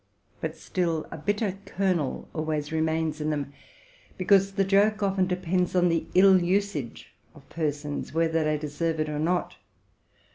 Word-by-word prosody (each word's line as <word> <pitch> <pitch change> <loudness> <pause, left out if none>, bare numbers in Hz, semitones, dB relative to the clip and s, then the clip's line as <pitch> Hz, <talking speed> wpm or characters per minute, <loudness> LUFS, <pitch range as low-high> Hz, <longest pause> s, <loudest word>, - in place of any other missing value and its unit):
But - - -4
still 170 -4 -1
a 165 - -6
bitter 205 +2 -1
kernel 185 -8 -1
always 155 -1 -2
remains 160 -1 0
in 150 - -1
them; 145 -2 -3 0.6
because 195 +1 +3
the 195 - +2
joke 205 +2 +3
often 190 -2 +1
depends 180 0 -1
on 180 -1 +4
the 165 -1 0
ill 190 0 +7
usage 180 - -2 0.2
of 140 -3 -17
persons, 150 -2 -3
whether 165 0 +1
they 155 0 +1
deserve 155 +2 -2
it 155 0 0
or 150 0 -3
not. 175 +3 -1
165 Hz, 150 wpm, -26 LUFS, 155-190 Hz, 0.6 s, ill